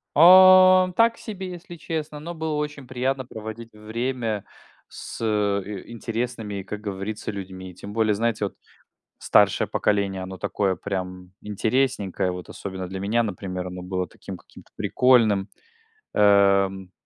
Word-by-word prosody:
Э. 185 +2 +8
Так 230 +1 +3
себе, 190 -4 -7
если 175 0 -10
честно. 155 -2 -5
Но 170 +3 -7
было 160 -2 -3
очень 150 -3 -4
приятно 130 +1 -2
проводить 110 0 -8
время 110 0 -3 0.4
с - - -9
и 100 -2 -1
интересными, 115 -3 -4
как 105 +2 -6
говорится, 105 +1 -5
людьми. 95 -2 -8
Тем 100 +3 -10
более, 110 -1 +2
знаете, 110 0 0
вот 100 - -6 0.6
старшее - - +3
поколение, 100 -2 0
оно 95 0 -7
такое 95 -1 -1
прям 90 -2 -5
интересненькое. 105 -3 -1
Вот 90 0 -8
особенно 95 -2 -6
для 95 +1 -6
меня, 110 +4 +1
например, 90 -3 -4
оно 90 0 -7
было 90 0 -3
таким 95 - -9
каким-то - - -18
прикольным. 110 -6 +3 0.7
Эм, 100 -2 +3
105 Hz, 135 wpm, -24 LUFS, 95-130 Hz, 0.7 s, Э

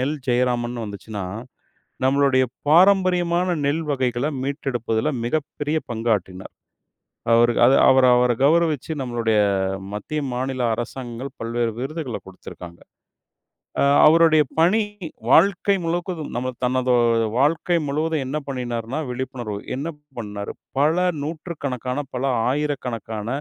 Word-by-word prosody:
நெல் 145 +4 -1
ஜெயராமன்னு 120 -1 0
வந்துச்சுன்னா, 100 -1 -6 0.8
நம்மளுடைய 135 -1 +3 0.2
பாரம்பரியமான 180 0 +4 0.2
நெல் 155 +3 0
வகைகளை 130 +1 0
மீட்டெடுப்பதுல 130 -3 -2 0.2
மிகப்பெரிய 150 +3 -2
பங்காற்றினார். 105 -5 -2 0.8
அவரு 120 +1 +5
அத 130 +3 +6 0.2
அவர் 130 -1 +5
அவரை 125 0 +3
கௌரவிச்சு 160 -1 +2
நம்மளுடைய 120 -3 0 0.6
மத்திய, 105 +9 -4
மாநில 130 +1 -2
அரசாங்கங்கள் 120 +2 -6
பல்வேறு 115 0 -1
விருதுகளை 135 -3 -4
கொடுத்திருக்காங்க. 90 -2 -11 1.3
அவருடைய 155 -1 +6 0.2
பணி 185 +7 +4 0.5
வாழ்க்கை 200 +2 +4
முழுவதும், 170 -1 -3
நம்ம 125 +1 -2
தனது 125 0 +1 0.4
வாழ்க்கை 165 +5 +2
முழுவதும் 155 +1 -1
என்ன 135 +4 -3
பண்ணினார்னா, 125 0 -3
விழிப்புணர்வு 125 -4 -5 0.2
என்ன 145 +5 -3 0.3
பண்ணாரு? 105 -3 -5 0.3
பல 150 +3 +3 0.3
100கணக்கான, 145 -5 -4
பல 125 +1 -3 0.3
1000கணக்கான 125 -7 -3
130 Hz, 100 wpm, -22 LUFS, 120-155 Hz, 1.3 s, அத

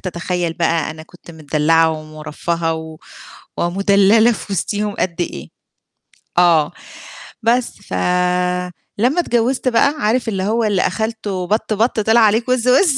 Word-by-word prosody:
تتخيل 175 -1 -3
بقى 165 -2 0
أنا 155 0 -9
كنت 175 +1 -16
متدلعة 160 +1 +1
ومُرفهة 155 +2 -4
و 160 -1 -8 0.6
ومدللة 200 +5 +3
في 200 -2 -5
وسطيهم 205 +2 -2
قد 175 -2 -1
إيه 75 - -5 0.9
آه. 165 -2 +4 0.7
بس، 240 +2 +1
فلمّا 180 - -1
اتجوزت 250 -4 0
بقى، 280 +4 +3
عارف 230 +4 0
اللي 190 -3 -2
هو 225 +4 0
اللي 205 -4 +1
أخلتُه 210 -3 -3
بَط 215 +2 0
بَط 220 +2 0
طِلِع 220 +2 +3
عليك 225 +3 +2
وِز 255 -1 +1
وِز، 270 +3 +4
190 Hz, 130 wpm, -18 LUFS, 165-225 Hz, 0.9 s, آه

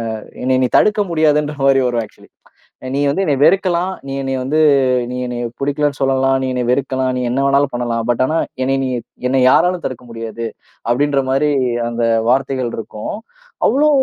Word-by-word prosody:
அ - - -5 0.2
என்னைய 130 0 +1
நீ - - +3
தடுக்க 210 0 +3
முடியாதுன்ற 150 -2 +2
மாரி 135 0 +5
வரும் 120 -1 0
ஆக்சுவலி. 110 - -16 0.7
நீ 140 - 0
வந்து 195 +7 0
என்னைய 140 -5 0
வெறுக்கலாம், 185 0 +2
நீ 135 - -4
என்னைய 135 -1 -2
வந்து 150 +5 0 0.5
நீ - - -4
என்னைய 120 -1 -4 0.2
புடிக்கலன்னு 145 0 -1
சொல்லலாம், 135 0 +2
நீ 130 - -1
என்னைய 125 -1 -2
வெறுக்கலாம், 130 0 0
நீ 125 - -2
என்ன 135 - 0
வேணாலும் 140 -1 +2
பண்ணலாம். 120 -1 -2
பட் 120 +1 +1
ஆனா 155 +5 0 0.3
என்னைய 135 +1 0
நீ - - -2 0.4
என்னைய 130 0 +2
யாராலும் 180 +3 +2
தடுக்க 125 -1 -5
முடியாது, 115 0 -5 0.4
அப்படின்ற 140 +3 +2
மாதிரி 135 +3 +2 0.4
அந்த 120 0 -2 0.3
வார்த்தைகள் 130 -1 0
இருக்கும். 110 - -6 0.5
அவ்வளோ 290 +6 +3
135 Hz, 170 wpm, -17 LUFS, 125-150 Hz, 0.7 s, மாரி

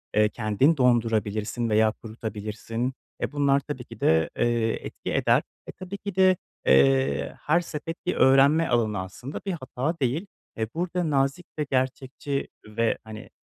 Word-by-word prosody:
eee, 105 0 +4
kendin 115 +9 +2
dondurabilirsin 115 -2 +1
veya 110 0 +4
kurutabilirsin. 110 +2 -5 0.3
Eee, - - -1
bunlar 140 -1 +3
tabii 140 -2 -6
ki - - -12
de, 80 0 +3
eee, 120 -1 +2 0.2
etki - - -5
eder. - - +3 0.3
Eee, - - -7
tabii 190 +1 -6
ki 200 -2 -6
de, 185 -1 +5 0.3
eee, 70 +1 +3
her 155 +3 +3
sepet 165 -1 -6
bir 180 - 0
öğrenme 140 +5 +5
alanı 110 -5 +1
aslında 95 +9 -6
bir 195 - -1
hata 155 0 -3
değil. 140 +9 -1 0.3
Eee, 110 0 -1
burada 175 0 -1
nazik 140 +4 +1
ve 150 - +1
gerçekçi 135 +1 -2 0.2
ve, 115 +2 0
hani 110 -1 -10
125 Hz, 150 wpm, -26 LUFS, 110-150 Hz, 0.3 s, de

